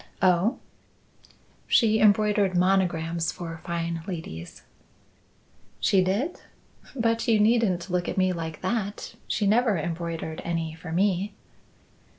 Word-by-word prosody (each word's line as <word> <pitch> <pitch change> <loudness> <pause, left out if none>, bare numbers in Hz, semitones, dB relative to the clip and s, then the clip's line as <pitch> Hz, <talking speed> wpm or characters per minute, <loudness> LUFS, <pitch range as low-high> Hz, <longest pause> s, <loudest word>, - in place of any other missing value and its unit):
"Oh!" 185 +6 +3 1.1
"She 220 -2 +4
embroidered 205 -2 +3
monograms 170 -3 +1
for 165 -2 -7
fine 170 -1 -3
ladies." 160 - -7 1.2
"She 190 -2 +3
did? 215 - -1 0.5
But 230 -2 0
you 225 -2 +4
needn't 210 -5 +2
look 180 -1 0
at - - -4
me 185 -1 +3
like 160 -2 -5
that. 205 +1 -3
She 210 - 0
never 220 0 +3
embroidered 165 -1 -4
any 165 -2 -2
for 160 +1 -9
me." 190 +3 0
185 Hz, 115 wpm, -26 LUFS, 170-210 Hz, 1.2 s, She